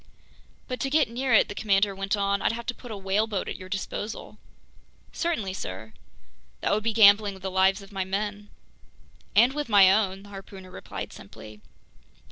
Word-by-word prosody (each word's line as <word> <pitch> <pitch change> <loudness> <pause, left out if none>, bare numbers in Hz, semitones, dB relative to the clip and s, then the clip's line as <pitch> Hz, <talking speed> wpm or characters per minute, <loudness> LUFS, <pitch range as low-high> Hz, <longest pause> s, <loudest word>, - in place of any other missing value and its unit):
"But 255 -2 -4
to 270 - -1
get 295 -4 +2
near 255 +2 -2
it," 220 - +5
the - - -6
commander 200 -1 +1
went 195 +2 -2
on, 200 0 0
"I'd - - +1
have 235 0 -6
to 245 - -2
put 245 - -12
a 215 - -5
whaleboat 195 +1 -1
at - - -4
your 185 0 -10
disposal?" 205 +2 -5 0.7
"Certainly, 230 - -2
sir." 110 - -7 0.7
"That - - 0
would 210 +1 0
be 230 - +1
gambling 205 -2 +6
with 190 - -15
the 190 - -3
lives 190 +2 +2
of 195 - -15
my 195 -1 -2
men." 205 +2 -4 0.9
"And 240 +5 +5
with 295 -3 -4
my 195 -3 +7
own!" 195 -2 0
the 205 - -14
harpooner 195 -1 -11
replied - - -7
simply. 105 -1 -13
200 Hz, 185 wpm, -26 LUFS, 190-220 Hz, 0.9 s, my